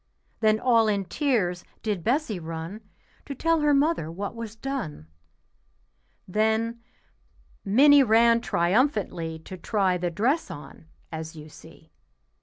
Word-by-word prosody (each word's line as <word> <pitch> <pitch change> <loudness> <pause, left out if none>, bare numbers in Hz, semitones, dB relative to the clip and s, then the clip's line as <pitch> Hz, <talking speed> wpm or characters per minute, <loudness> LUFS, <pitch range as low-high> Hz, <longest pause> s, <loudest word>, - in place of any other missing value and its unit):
Then 215 0 +3
all 230 -3 +3
in 200 -2 0
tears 190 - 0 0.2
did 205 -6 -2
Bessie 240 - 0
run 165 +5 -6 0.5
To 280 - -5
tell 330 +4 +1
her 295 0 +3
mother 285 - +1
what 195 +4 -5
was 230 -2 -7
done. 225 - -5 1.2
Then 220 +4 0 0.8
Minnie 280 +8 +6
ran 230 -1 +4
triumphantly 180 - 0
To 185 - -8
try 185 -1 0
the 175 0 -1
dress 245 - 0
on, 150 +2 -11 0.2
as 160 0 -6
you 155 0 -11
see. - - -16
215 Hz, 125 wpm, -26 LUFS, 175-250 Hz, 1.2 s, Minnie